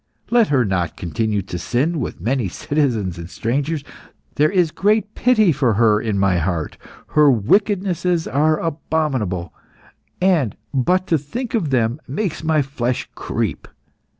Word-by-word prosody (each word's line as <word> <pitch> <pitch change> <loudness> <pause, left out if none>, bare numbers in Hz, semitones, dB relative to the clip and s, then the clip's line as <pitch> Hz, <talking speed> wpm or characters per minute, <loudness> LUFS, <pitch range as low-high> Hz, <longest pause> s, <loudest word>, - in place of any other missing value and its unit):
Let 235 -2 +5
her 130 -4 +2
not 90 -5 -1
continue 105 +3 -1
to 90 -2 -6
sin 145 - 0
with - - -4
many 120 +4 0
citizens 110 - -1
and 85 0 -8
strangers. 140 - -2 0.5
There 150 +1 +3
is 180 -5 +2
great 210 +3 +1
pity 220 -7 +3
for 130 -7 +1
her 105 -1 +3
in 110 -3 -1
my 95 -2 +2
heart. 85 -2 -2 0.3
Her 150 -1 +5
wickednesses 180 - +1
are 155 +3 +2
abominable, 135 - -2 0.7
and 170 - +2 0.2
but 180 +8 +2
to 165 -4 +1
think 235 - -5
of 200 -11 0
them 120 +1 0
makes 160 +5 -3
my 155 -2 +2
flesh 130 -2 -3
creep. - - -3
140 Hz, 145 wpm, -20 LUFS, 110-165 Hz, 0.7 s, Let